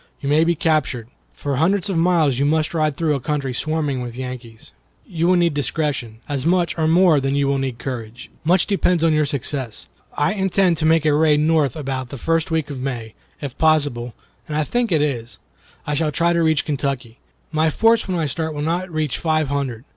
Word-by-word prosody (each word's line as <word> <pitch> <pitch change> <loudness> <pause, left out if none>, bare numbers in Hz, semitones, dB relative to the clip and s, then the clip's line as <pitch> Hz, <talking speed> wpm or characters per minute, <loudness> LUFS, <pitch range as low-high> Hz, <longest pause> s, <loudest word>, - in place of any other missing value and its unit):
You 140 - -3
may 155 +2 +4
be 170 +1 +2
captured. 150 -8 0 0.3
For 140 -2 -3
hundreds 185 +6 +2
of 195 - -2
miles 165 -6 +2
you - - +2
must 155 +2 +1
ride 155 -3 0
through 160 -3 +1
a 140 - -1
country 135 0 -2
swarming 150 -1 -1
with 120 -1 -6
Yankees. 125 -3 -8 0.3
You 170 -2 -1
will 185 - +4
need 170 -2 +2
discretion, 140 -6 -2
as 140 -3 -2
much 175 +1 +1
or 160 -1 0
more 170 -2 +5
than 135 0 -1
you 140 -1 +1
will 140 0 +1
need 130 -3 -3
courage. 120 -2 -7
Much 175 +3 +3
depends 180 -4 +1
on 165 -1 +4
your 155 -1 +2
success. 135 -4 -4 0.3
I 150 +8 +2
intend 190 -3 +2
to 155 - +1
make 160 -1 +3
a 150 - +4
raid 150 0 +4
north 155 -4 +2
about 130 -4 -4
the 140 - -7
first 165 +4 0
week 160 -3 -1
in 130 -2 -6
May. 120 -5 -4 0.3
If 140 -4 -5
possible 145 -7 +1 0.3
(and 150 - -3
I 155 - +2
think 240 +6 -1
it 155 -3 +3
is), 120 -6 -3 0.5
I 150 - -2
shall 155 +1 0
try 170 +3 +2
to 170 - +2
reach 160 -2 +2
Kentucky. 135 -5 -3 0.3
My 160 0 +2
force 225 +7 +3
when 185 -2 -1
I 165 - 0
start 160 +2 -3
will 145 - -3
not 175 +4 -1
reach 155 -4 -2
five 155 -3 0
hundred. 135 -4 -3
150 Hz, 215 wpm, -21 LUFS, 135-165 Hz, 0.5 s, more